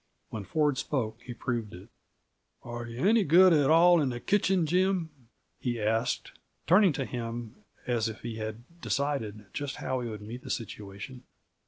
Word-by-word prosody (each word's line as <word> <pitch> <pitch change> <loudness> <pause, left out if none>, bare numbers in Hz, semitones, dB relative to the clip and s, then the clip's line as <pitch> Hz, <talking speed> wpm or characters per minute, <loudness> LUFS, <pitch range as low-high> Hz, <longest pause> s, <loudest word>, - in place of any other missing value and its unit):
When 105 -3 -5
Ford 150 -1 +1
spoke, 120 -6 -2
he 120 0 -8
proved 115 -5 -3
it. 90 - -13 0.7
"Are 120 0 -6
you 120 +6 -3
any 225 0 +5
good 180 +2 +7
at 145 -3 +4
all 170 +1 +6
in 140 - +1
the 120 -1 -4
kitchen, 190 0 +2
Jim?" 180 0 +1 0.5
he 120 -2 -2
asked, 110 +3 0 0.3
turning 185 +2 +6
to 135 -1 -2
him 120 -1 -5 0.3
as 120 -2 0
if 110 - -9
he 115 -1 -5
had 110 +1 -5 0.2
decided 135 -10 -2
just 145 -2 -3
how 130 0 -2
he 120 - -4
would 105 -2 -7
meet 115 +4 -7
the - - -10
situation. 105 +2 -6
125 Hz, 170 wpm, -29 LUFS, 115-155 Hz, 0.7 s, good